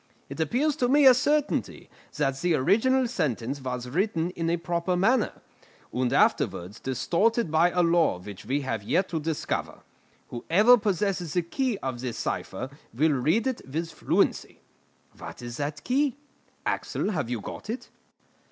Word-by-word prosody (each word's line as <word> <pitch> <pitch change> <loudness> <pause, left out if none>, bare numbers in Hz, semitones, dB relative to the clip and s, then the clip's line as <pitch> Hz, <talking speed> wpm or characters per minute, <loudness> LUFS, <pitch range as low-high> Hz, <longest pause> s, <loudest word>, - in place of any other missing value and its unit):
It - - -8
appears 265 - +1
to 245 - +1
me 285 +1 +5
a 260 - +10
certainty 290 +4 0 0.3
that 135 -2 0
the 175 -2 +2
original 250 - +3
sentence 140 - -2
was 125 -1 -4
written 170 - 0
in 165 -2 -2
a 170 - +1
proper 175 +1 -1
manner, 220 +6 +1 0.5
and 125 -1 0
afterwards 90 +5 +1
distorted 175 - 0
by 165 +2 +4
a 180 0 +1
law 170 - +3
which 95 +1 -10
we 140 +3 -1
have 120 -6 -3
yet 185 - 0
to 165 - -2
discover. 155 0 -3 0.5
Whoever 200 - +5
possesses 195 -5 -1
the 175 - +1
key 245 +6 -1
of 130 -2 -3
this 125 -3 -4
cipher 130 - -4 0.2
will 150 +7 +2
read 155 - +1
it 260 -2 -1
with 165 +3 -3
fluency. - - 0 0.6
What - - -9
is 120 0 -6
that 145 +1 -4
key? 275 +2 +1 0.5
Axel, - - -1
have 155 - -2
you 120 -2 -2
got 105 - -8
it?" 235 +4 -5
170 Hz, 160 wpm, -27 LUFS, 135-220 Hz, 0.6 s, a